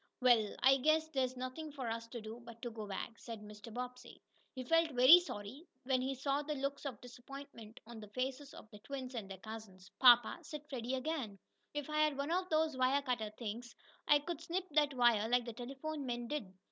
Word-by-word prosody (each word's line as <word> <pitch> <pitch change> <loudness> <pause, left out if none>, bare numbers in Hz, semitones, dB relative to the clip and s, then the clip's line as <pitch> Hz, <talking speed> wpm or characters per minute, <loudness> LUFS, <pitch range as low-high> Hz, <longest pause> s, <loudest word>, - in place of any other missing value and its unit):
"Well, 240 -5 +4
I 270 +1 +7
guess 310 +4 +3
there's 260 -3 -1
nothing 255 +5 -5
for 270 -4 -5
us 230 0 -3
to 235 0 -7
do 220 +2 -8
but 235 -1 -11
to 240 - -3
go 220 -2 -6
back," 205 +3 -5
said 230 -3 -7
Mr. 210 +2 -10
Bobbsey. 250 +2 -7 0.4
He 255 - -4
felt 330 +5 +3
very 260 +8 +9
sorry, 270 - -7 0.2
when 255 0 +1
he 265 +1 -1
saw 275 +2 0
the 300 0 -3
looks 275 +1 -3
of 245 -7 -6
disappointment 245 -2 -10
on 235 0 -9
the 210 - -9
faces 260 +5 -3
of - - -11
the 210 - -11
twins 260 +2 -6
and 220 -5 -5
their 195 - -7
cousins. 195 -2 -10
"Papa," 240 +3 +7
said 300 -2 -7
Freddie 250 0 -2
again, 260 -7 -3 0.4
"if 290 -2 -2
I 305 0 -1
had 305 -2 +3
one 280 +3 -2
of 365 +1 0
those 315 -2 +2
wire 260 +2 +2
cutter 240 -5 -1
things, 235 +1 -6 0.3
I 295 - +7
could 315 +2 -5
snip 350 +3 -2
that 295 -2 +3
wire 235 -3 +4
like 245 0 +3
the 235 - -5
telephone 275 +5 -5
men 240 -1 -3
did." 285 -10 -4
255 Hz, 210 wpm, -36 LUFS, 230-285 Hz, 0.4 s, very